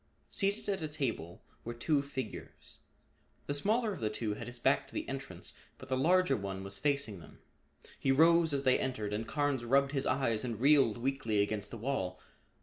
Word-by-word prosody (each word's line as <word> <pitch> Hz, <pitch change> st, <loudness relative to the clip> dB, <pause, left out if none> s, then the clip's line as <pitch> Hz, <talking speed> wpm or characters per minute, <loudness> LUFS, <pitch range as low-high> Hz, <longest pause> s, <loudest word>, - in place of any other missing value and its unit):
Seated 200 Hz, +1 st, 0 dB
at 195 Hz, -3 st, -1 dB
a 155 Hz, -, -1 dB
table 125 Hz, -, -4 dB, 0.2 s
were 120 Hz, +1 st, -5 dB
two 145 Hz, +4 st, +1 dB
figures. 135 Hz, -5 st, -7 dB, 0.7 s
The 145 Hz, -, -2 dB
smaller 215 Hz, +8 st, +1 dB
of -, -, -7 dB
the 110 Hz, -, 0 dB
two 105 Hz, 0 st, -2 dB
had 110 Hz, +2 st, -7 dB
his 120 Hz, 0 st, -3 dB
back 135 Hz, +3 st, +2 dB
to -, -, -16 dB
the -, -, -3 dB
entrance 135 Hz, -9 st, -7 dB, 0.2 s
but 130 Hz, -, -12 dB
the 130 Hz, -, +1 dB
larger 175 Hz, +2 st, +3 dB
one 95 Hz, -3 st, -4 dB
was 100 Hz, 0 st, -4 dB
facing 140 Hz, -9 st, 0 dB
them. 80 Hz, -, -14 dB, 0.6 s
He 135 Hz, -, +2 dB
rose 165 Hz, +3 st, +5 dB
as 140 Hz, -1 st, 0 dB
they 130 Hz, -1 st, +4 dB
entered 110 Hz, -6 st, -2 dB
and 110 Hz, +2 st, -3 dB
Carnes 145 Hz, -4 st, 0 dB
rubbed 135 Hz, +3 st, +3 dB
his 135 Hz, -2 st, -1 dB
eyes 115 Hz, -5 st, +1 dB
and 115 Hz, -4 st, -3 dB
reeled 135 Hz, -4 st, +5 dB
weakly 115 Hz, -5 st, 0 dB
against 105 Hz, 0 st, -2 dB
the -, -, -7 dB
wall. 105 Hz, -7 st, -2 dB
130 Hz, 195 wpm, -32 LUFS, 110-145 Hz, 0.7 s, rose